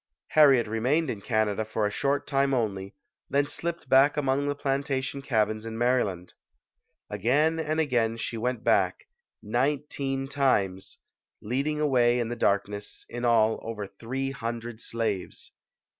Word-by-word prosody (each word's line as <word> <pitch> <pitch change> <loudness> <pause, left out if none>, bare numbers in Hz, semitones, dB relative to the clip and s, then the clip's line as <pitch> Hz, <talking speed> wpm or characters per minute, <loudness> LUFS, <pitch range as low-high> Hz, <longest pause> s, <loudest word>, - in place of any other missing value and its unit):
Harriet 140 -6 +6
remained 125 +9 0
in 105 - -6
Canada 110 -1 0
for 110 0 -2
a 105 - 0
short 140 +5 0
time 135 -1 +1
only, 100 -5 -2 0.3
then 140 +1 +2
slipped 170 +1 -4
back 135 +3 +5
among 140 0 +1
the 145 - -1
plantation 140 -1 -2
cabins 110 -4 0
in 115 0 -6
Maryland. 115 -8 0 0.8
Again 140 - +2
and 155 0 -1
again 120 -7 +1
she 115 - -4
went 120 +1 -2
back - - +2 0.4
nineteen 135 +3 -1
times 105 -10 0 0.4
leading 140 +7 -2
away 125 -5 +3
in 115 -1 -1
the 120 - -3
dark 100 -4 +2
ness, 105 0 -8
in 120 +1 -6
all, 110 -2 +3
over 110 -2 -5
three 130 +7 -4
hundred 115 -2 -5
slaves. 110 -5 -3
120 Hz, 145 wpm, -27 LUFS, 110-140 Hz, 0.8 s, Harriet